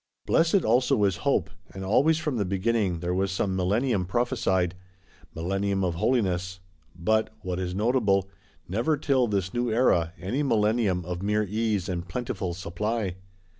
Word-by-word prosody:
Blessed 165 Hz, +3 st, +3 dB
also 120 Hz, -2 st, +3 dB
is 95 Hz, -3 st, +2 dB
Hope; -, -, 0 dB, 0.2 s
and 95 Hz, 0 st, -5 dB
always 145 Hz, +11 st, +3 dB
from 150 Hz, -5 st, -2 dB
the 105 Hz, -, +1 dB
beginning 95 Hz, -2 st, 0 dB
there 90 Hz, 0 st, -1 dB
was 95 Hz, +1 st, 0 dB
some 95 Hz, 0 st, -1 dB
Millennium 100 Hz, +1 st, +1 dB
prophesied; 95 Hz, -6 st, 0 dB, 0.6 s
Millennium 95 Hz, +3 st, -1 dB
of 90 Hz, -2 st, 0 dB
Holiness; 95 Hz, -3 st, 0 dB, 0.4 s
but 110 Hz, +6 st, +1 dB
(what 90 Hz, 0 st, -3 dB
is 90 Hz, -1 st, -3 dB
notable) 105 Hz, -3 st, +2 dB, 0.4 s
never 120 Hz, -, 0 dB
till 135 Hz, -4 st, +2 dB
this 95 Hz, -3 st, -1 dB
new 120 Hz, -1 st, 0 dB
Era, 90 Hz, -8 st, +2 dB
any 100 Hz, +11 st, -2 dB
Millennium 105 Hz, -, +1 dB
of 90 Hz, 0 st, -4 dB
mere 105 Hz, +2 st, +1 dB
Ease 105 Hz, -1 st, -1 dB
and 90 Hz, -1 st, -3 dB
plentiful 95 Hz, -3 st, -3 dB
Supply. 95 Hz, +2 st, -3 dB
100 Hz, 150 wpm, -26 LUFS, 90-115 Hz, 0.6 s, Blessed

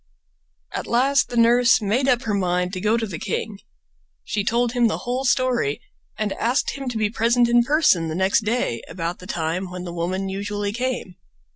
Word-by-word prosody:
At -, -, -4 dB
last 270 Hz, +4 st, +2 dB
the 240 Hz, -, -4 dB
nurse 240 Hz, +2 st, +5 dB
made 230 Hz, +5 st, 0 dB
up 245 Hz, -2 st, +2 dB
her 215 Hz, -, -2 dB
mind 180 Hz, -1 st, 0 dB
to 185 Hz, -, -4 dB
go 215 Hz, +3 st, +2 dB
to 230 Hz, -, -1 dB
the 180 Hz, -7 st, -6 dB
king. 205 Hz, -3 st, -4 dB, 0.6 s
She 205 Hz, -, -2 dB
told 235 Hz, +3 st, +1 dB
him 240 Hz, -1 st, +3 dB
the 220 Hz, -, -1 dB
whole 250 Hz, +2 st, -2 dB
story 245 Hz, -, +1 dB, 0.4 s
and 215 Hz, -2 st, -1 dB
asked 245 Hz, +5 st, 0 dB
him 270 Hz, -2 st, -5 dB
to 240 Hz, -, -4 dB
be 210 Hz, -1 st, 0 dB
present 235 Hz, +2 st, +2 dB
in 240 Hz, 0 st, +4 dB
person 290 Hz, -, +3 dB
the 160 Hz, -, -4 dB
next 190 Hz, +5 st, +2 dB
day 215 Hz, -, -1 dB
about 170 Hz, 0 st, -4 dB
the 180 Hz, -, -11 dB
time 170 Hz, +3 st, -2 dB
when 180 Hz, 0 st, -7 dB
the 175 Hz, -1 st, -6 dB
woman 185 Hz, +3 st, -2 dB
usually 200 Hz, +1 st, -3 dB
came. 245 Hz, -6 st, -3 dB
215 Hz, 195 wpm, -22 LUFS, 185-245 Hz, 0.6 s, nurse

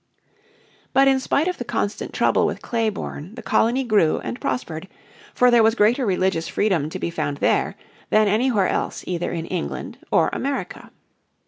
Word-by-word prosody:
But 270 Hz, +1 st, +5 dB
in 270 Hz, -1 st, +4 dB
spite 280 Hz, +4 st, 0 dB
of 360 Hz, -, -2 dB
the -, -, -2 dB
constant 205 Hz, -3 st, -3 dB
trouble -, -, +2 dB
with -, -, -5 dB
Clayborne 215 Hz, -5 st, -3 dB
the 240 Hz, -, -9 dB
colony 245 Hz, +4 st, +2 dB
grew 210 Hz, -10 st, +3 dB
and 115 Hz, +1 st, -6 dB
prospered, 155 Hz, +6 st, -3 dB, 0.5 s
for 250 Hz, 0 st, +5 dB
there 240 Hz, -1 st, +6 dB
was 225 Hz, +1 st, +4 dB
greater 235 Hz, +3 st, +3 dB
religious 185 Hz, -3 st, 0 dB
freedom 175 Hz, -8 st, 0 dB
to -, -, -5 dB
be 170 Hz, -, -3 dB
found 145 Hz, -3 st, -2 dB
there -, -, +1 dB, 0.3 s
than 215 Hz, 0 st, +4 dB
anywhere 215 Hz, -2 st, +2 dB
else -, -, -2 dB
either 175 Hz, -1 st, -2 dB
in 165 Hz, -1 st, -3 dB
England 70 Hz, -, -5 dB
or -, -, +3 dB
America. -, -, -4 dB
210 Hz, 165 wpm, -22 LUFS, 165-240 Hz, 0.5 s, there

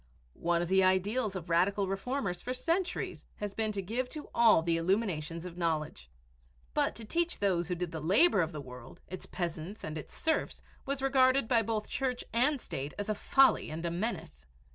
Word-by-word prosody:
One 170 Hz, 0 st, +2 dB
of -, -, -3 dB
the 190 Hz, +1 st, +4 dB
ideals 200 Hz, +4 st, +1 dB
of 175 Hz, -3 st, -5 dB
radical 190 Hz, +4 st, +2 dB
reformers 195 Hz, -2 st, -2 dB
for 255 Hz, +1 st, -3 dB
centuries 335 Hz, +7 st, -1 dB
had 205 Hz, -1 st, -5 dB
been 220 Hz, -1 st, 0 dB
to 195 Hz, -1 st, -3 dB
give 245 Hz, +6 st, -2 dB
to 305 Hz, -2 st, -8 dB
all 225 Hz, -8 st, +6 dB
the 165 Hz, 0 st, +1 dB
illumination 170 Hz, -2 st, -1 dB
of 180 Hz, 0 st, -8 dB
knowledge. 155 Hz, -, -2 dB, 0.6 s
But -, -, +1 dB
to 225 Hz, -, -7 dB
teach 340 Hz, +9 st, 0 dB
those 180 Hz, -4 st, +1 dB
who 180 Hz, -, -1 dB
did 175 Hz, -1 st, -3 dB
the 160 Hz, -, -5 dB
labor 195 Hz, -, +4 dB
of 165 Hz, 0 st, -1 dB
the 150 Hz, -3 st, -6 dB
world, 125 Hz, -2 st, -11 dB
its 185 Hz, +1 st, -7 dB
peasants 175 Hz, +3 st, -4 dB
and 155 Hz, 0 st, -4 dB
its -, -, -11 dB
serfs, 320 Hz, -, -1 dB, 0.2 s
was 275 Hz, -1 st, -2 dB
regarded 265 Hz, -2 st, +4 dB
by 235 Hz, -1 st, +4 dB
both 220 Hz, -1 st, -2 dB
Church 255 Hz, -2 st, -2 dB
and 260 Hz, +5 st, +3 dB
State 140 Hz, -, -5 dB
as 205 Hz, +1 st, -4 dB
a -, -, +3 dB
folly 270 Hz, +5 st, +4 dB
and 160 Hz, +2 st, -5 dB
a 170 Hz, -, -1 dB
menace. 170 Hz, -, -4 dB
195 Hz, 195 wpm, -31 LUFS, 170-240 Hz, 0.6 s, all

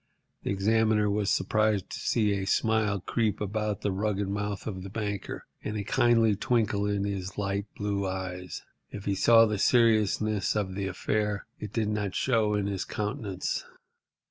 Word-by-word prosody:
The -, -, -4 dB
examiner 105 Hz, +1 st, +2 dB
was 105 Hz, -1 st, 0 dB
surprised 105 Hz, 0 st, +1 dB
to -, -, -5 dB
see 110 Hz, -3 st, +1 dB
a 95 Hz, -1 st, -2 dB
smile 110 Hz, -4 st, +1 dB
creep 110 Hz, +2 st, 0 dB
about 105 Hz, 0 st, -2 dB
the 100 Hz, -, 0 dB
rugged 100 Hz, 0 st, -1 dB
mouth 100 Hz, 0 st, -3 dB
of 95 Hz, -4 st, -4 dB
the 95 Hz, -, -7 dB
banker, 100 Hz, -1 st, -4 dB, 0.2 s
and 105 Hz, -, -3 dB
a 100 Hz, -, -2 dB
kindly 115 Hz, 0 st, +3 dB
twinkle 105 Hz, -2 st, +1 dB
in 100 Hz, -1 st, 0 dB
his 95 Hz, -2 st, -4 dB
light 100 Hz, 0 st, -1 dB
blue 100 Hz, -1 st, -1 dB
eyes. 90 Hz, -2 st, -5 dB, 0.3 s
If 100 Hz, -, -8 dB
he 100 Hz, -, +1 dB
saw 115 Hz, +4 st, +6 dB
the 105 Hz, -2 st, -1 dB
seriousness 110 Hz, -3 st, +3 dB
of 100 Hz, -3 st, -1 dB
the 95 Hz, 0 st, -2 dB
affair, 105 Hz, +2 st, -1 dB
it 105 Hz, -, -6 dB
did 110 Hz, -2 st, 0 dB
not 105 Hz, -3 st, -2 dB
show 110 Hz, -5 st, +2 dB
in 105 Hz, -1 st, 0 dB
his 100 Hz, -2 st, -2 dB
countenance. 105 Hz, -3 st, -3 dB
105 Hz, 170 wpm, -28 LUFS, 100-110 Hz, 0.3 s, saw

